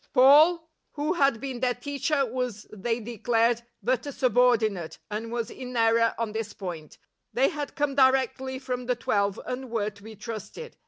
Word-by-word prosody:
Paul, 310 +6 +6 0.3
who 300 +3 -1
had 275 -8 +2
been 260 -1 -5
their 250 -1 +1
teacher, 280 +2 -1
was, 245 -3 -4
they 230 +3 -2
declared, 230 +1 +1 0.2
but 255 +2 0
a - - -3
subordinate, 240 - +2
and 225 +2 -4
was 235 -1 -3
in 250 -1 -7
error 230 0 +3
on 230 -2 -2
this 220 0 -4
point; 170 -6 -7 0.4
they 255 +4 +3
had 295 -4 -5
come 290 -1 0
directly 260 -1 +2
from 250 -2 -4
the 250 - +1
Twelve, 200 -4 0
and 255 0 -5
were 215 -2 -1
to 200 -1 -19
be 220 +1 -10
trusted. 230 - -8
245 Hz, 170 wpm, -27 LUFS, 225-265 Hz, 0.4 s, Paul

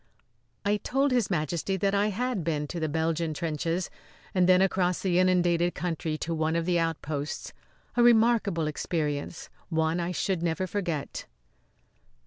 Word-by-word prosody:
I 205 +1 +3
told 270 +6 0
His 245 -5 +2
Majesty 170 +2 -1
that 195 +2 +1
I 200 +1 +3
had 225 -1 -1
been 155 -2 -1
to 175 - -4
the 155 -1 -1
Belgian 160 0 -1
trenches, 165 +3 -2 0.4
and 185 -1 +3
then 185 0 +7
across 185 -2 +2
the 180 -2 +2
inundated 175 -1 +3
country 160 -3 -2
to 165 +2 -3
one 160 0 0
of 170 0 0
the 175 -1 +2
outposts; 155 -3 -3 0.4
a 245 - +3
remarkable 225 -7 +4
experience 150 0 -3 0.2
one 160 0 +1
I 175 +1 -1
should 180 -1 -1
never 170 +2 0
forget. 175 -6 -3
175 Hz, 150 wpm, -28 LUFS, 160-190 Hz, 0.4 s, then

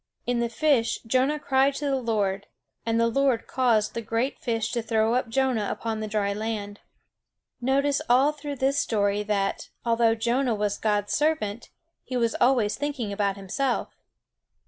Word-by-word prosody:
In 245 0 0
the 235 0 0
fish 255 -1 +1
Jonah 260 +6 +2
cried 270 -1 +2
to 290 - -4
the 275 -1 +1
Lord; 205 -4 -1 0.4
and 225 0 +2
the 230 - +4
Lord 255 0 +1
caused 230 -5 +1
the 230 - -3
great 230 +4 -2
fish 225 -3 -1
to 235 - -1
throw 225 0 +1
up 250 -1 0
Jonah 250 -4 +1
upon 225 -1 -3
the 215 - -3
dry 205 -1 0
land. 205 -1 -4 0.8
Notice 275 +3 +1
all 265 +4 +5
through 290 -1 -6
this 275 +2 +1
story 205 -2 +1
that, 200 -1 -1 0.2
although 230 -1 +3
Jonah 240 +2 +1
was 205 -1 -1
God's 205 -2 0
servant, 295 -8 0 0.3
he 255 - -3
was 230 -2 +1
always 240 -5 +3
thinking 275 -8 -3
about 200 -1 0
himself. 240 +7 -1
230 Hz, 165 wpm, -26 LUFS, 215-265 Hz, 0.8 s, all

